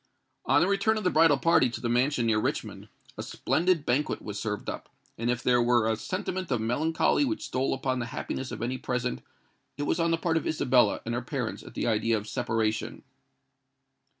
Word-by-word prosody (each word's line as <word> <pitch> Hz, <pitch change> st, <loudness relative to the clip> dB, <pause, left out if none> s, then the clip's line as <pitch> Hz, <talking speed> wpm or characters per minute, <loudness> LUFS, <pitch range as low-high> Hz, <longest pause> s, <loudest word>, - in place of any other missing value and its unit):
On -, -, +4 dB
the 180 Hz, -, +3 dB
return 200 Hz, +3 st, +2 dB
of 215 Hz, -, -3 dB
the 180 Hz, -, +2 dB
bridal 155 Hz, -2 st, +5 dB
party 135 Hz, -4 st, +4 dB
to 115 Hz, -, -6 dB
the 120 Hz, -, -3 dB
mansion 125 Hz, +1 st, +1 dB
near 110 Hz, -1 st, +2 dB
Richmond, -, -, -3 dB, 0.3 s
a -, -, -1 dB
splendid 170 Hz, -3 st, 0 dB
banquet 135 Hz, +5 st, 0 dB
was 105 Hz, -1 st, -6 dB
served 105 Hz, -2 st, -4 dB
up; -, -, -5 dB, 0.3 s
and 115 Hz, +1 st, -2 dB
if 120 Hz, 0 st, -1 dB
there 125 Hz, -1 st, +4 dB
were 120 Hz, -2 st, +3 dB
a 110 Hz, -, +2 dB
sentiment 185 Hz, -, -4 dB
of 125 Hz, -4 st, +1 dB
melancholy 155 Hz, -, +1 dB
which 305 Hz, +4 st, -2 dB
stole 130 Hz, +1 st, -1 dB
upon 130 Hz, -1 st, -1 dB
the 120 Hz, -, -3 dB
happiness 130 Hz, +1 st, -5 dB
of -, -, -5 dB
any 130 Hz, +2 st, -2 dB
present, 125 Hz, -1 st, -2 dB, 0.6 s
it 145 Hz, -, -2 dB
was 145 Hz, -, 0 dB
on 165 Hz, 0 st, +2 dB
the 165 Hz, -, +2 dB
part 165 Hz, 0 st, 0 dB
of -, -, -2 dB
Isabella 130 Hz, -5 st, +2 dB
and 115 Hz, -, -2 dB
her 120 Hz, -, -1 dB
parents 120 Hz, -, -4 dB
at -, -, -13 dB
the -, -, -2 dB
idea 115 Hz, 0 st, +2 dB
of 105 Hz, 0 st, -6 dB
separation. 110 Hz, 0 st, -2 dB
125 Hz, 205 wpm, -28 LUFS, 115-160 Hz, 0.6 s, bridal